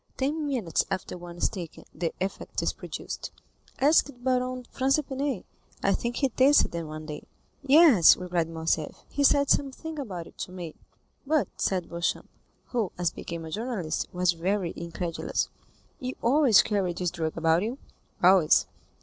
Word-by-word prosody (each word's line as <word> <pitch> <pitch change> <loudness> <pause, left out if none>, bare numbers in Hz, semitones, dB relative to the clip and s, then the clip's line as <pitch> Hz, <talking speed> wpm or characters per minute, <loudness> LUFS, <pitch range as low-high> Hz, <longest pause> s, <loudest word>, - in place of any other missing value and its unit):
Ten 295 +3 -1
minutes 230 - 0
after 190 -2 -3
one 175 -1 -9
is - - +2
taken, 175 -5 -8
the 165 0 -2
effect 190 +1 -3
is - - 0
produced. - - -6 0.5
Ask 290 +2 +4
Baron 255 0 -1
Franz 270 +1 +2
d'Épinay; 275 -5 -2 0.4
I 195 - +3
think 235 +3 -2
he 270 0 +1
tasted 265 +4 +4
them 170 -2 -4
one 155 0 -7
day." 150 -1 -6 0.4
"Yes," 280 - +7
replied 175 -2 -1
Morcerf, 160 -1 -2
"he 285 - 0
said 280 0 +4
something 300 +3 -1
about 185 -11 -5
it - - -17
to - - -5
me." 175 -4 -7 0.5
"But," 310 -1 +2
said 185 -3 0
Beauchamp, 170 0 -2 0.4
who, 225 -7 -1
as 175 -2 0
became 165 -1 -7
a 160 - -8
journalist, 215 -6 -2
was 180 0 +2
very 180 +1 -1
incredulous, 170 0 -3 0.5
"you 255 0 -4
always 255 -3 +5
carry 195 -4 0
this 175 0 -2
drug 160 -3 -3
about 165 +1 +3
you?" 230 +6 -3 0.5
"Always." 180 -3 +6
190 Hz, 160 wpm, -27 LUFS, 170-265 Hz, 0.5 s, Yes